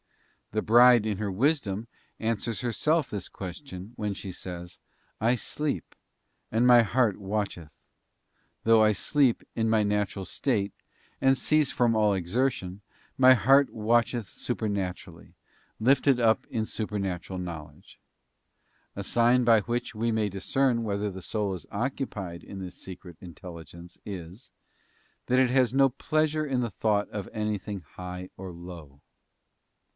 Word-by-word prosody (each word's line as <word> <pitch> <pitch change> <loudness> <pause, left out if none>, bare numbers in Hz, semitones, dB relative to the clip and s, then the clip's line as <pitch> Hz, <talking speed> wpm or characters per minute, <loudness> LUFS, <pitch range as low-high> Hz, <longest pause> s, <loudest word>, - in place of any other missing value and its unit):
The 110 - 0
Bride 120 0 +6
in 105 -3 -1
her 105 -2 -2
wisdom 115 -2 0 0.3
answers 115 -1 -2
herself 145 +5 +1
this 100 -3 -5
question, 95 - -8
when 105 -2 -2
she 95 - -6
says, 90 -1 -8 0.4
'I 115 +3 +3
sleep, 140 - -3 0.6
and 115 +2 +2
my 120 -1 +8
heart 115 -2 +1
watcheth 100 -5 -3
:'t - - -35 0.9
though 115 -1 +6
I 105 - +5
sleep 125 +4 +2
in 110 -1 +1
my 110 -1 +3
natural 105 -2 -1
state, 105 -6 -1 0.5
and 135 0 +4
cease 155 -1 +2
from 120 -2 +2
all 105 -2 +3
exertion, 95 0 -1 0.3
my 130 0 +7
heart 135 +3 +5
watcheth 115 +1 +1
supernaturally, 95 -6 -4 0.4
lifted 135 +2 +4
up 115 -2 +3
in 110 -3 -2
supernatural 95 -4 -4
knowledge. 85 -4 -9 1.0
<A 100 - -4
sign 120 +3 +3
by 115 -2 +6
which 120 +4 -3
we 115 +2 0
may 110 -1 +1
discern 115 +5 0
whether 105 -1 -2
the 95 0 -8
soul 105 0 -2
is 90 - -8
occupied 100 -7 -4
in 100 - -9
this 90 -1 -7
secret 90 -2 -10
intelligence 85 0 -11
is, 95 +4 -8 0.8
that 125 +1 +3
it 130 -2 +3
has 130 -2 +3
no 135 0 +5
pleasure 155 +3 0
in 135 -3 0
the 120 -3 -1
thought 105 +1 +1
of 100 -2 -5
anything 105 -2 -3
high 90 +3 -8
or 95 -1 -7
low. 85 -5 -11
105 Hz, 140 wpm, -27 LUFS, 95-120 Hz, 1.0 s, my